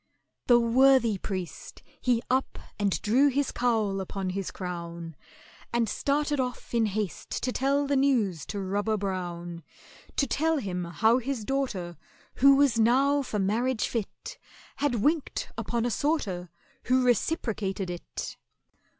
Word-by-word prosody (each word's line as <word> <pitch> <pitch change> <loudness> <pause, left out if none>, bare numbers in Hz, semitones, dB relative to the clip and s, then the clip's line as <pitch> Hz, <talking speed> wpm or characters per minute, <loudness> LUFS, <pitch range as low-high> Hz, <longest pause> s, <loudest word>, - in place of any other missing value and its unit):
The 240 -1 +7
worthy 235 -2 +4
priest, 185 -3 -6 0.2
he 240 -2 +2
up 260 +1 0 0.2
and 200 -6 +1
drew 255 +7 +4
his 280 0 +1
cowl 220 -5 +1
upon 190 0 -3
his 195 0 -3
crown, 170 -3 -6 0.6
And 235 -1 +1
started 290 +4 0
off 250 -1 -3
in 230 -2 +3
haste 205 -5 -3
to 255 - 0
tell 280 +3 +1
the 280 0 +1
news 235 - +1
to 205 - -4
ROBBER 205 +3 0
BROWN— 175 -3 -4 0.5
To 280 - +2
tell 315 +5 +1
him 180 -8 -3
how 220 +8 +3
his 255 -3 -3
daughter, 205 -11 -2 0.4
who 275 +1 +7
was 275 -5 +3
now 270 +5 +4
for 245 -5 -3
marriage 220 +5 +1
fit, 225 -4 -5 0.4
Had 285 -3 +1
winked 295 +7 0
upon 235 -1 -2
a 245 - 0
sorter, 215 - -1 0.4
who 255 0 +3
reciprocated 210 - 0
it. 175 - -6
230 Hz, 140 wpm, -28 LUFS, 195-270 Hz, 0.6 s, The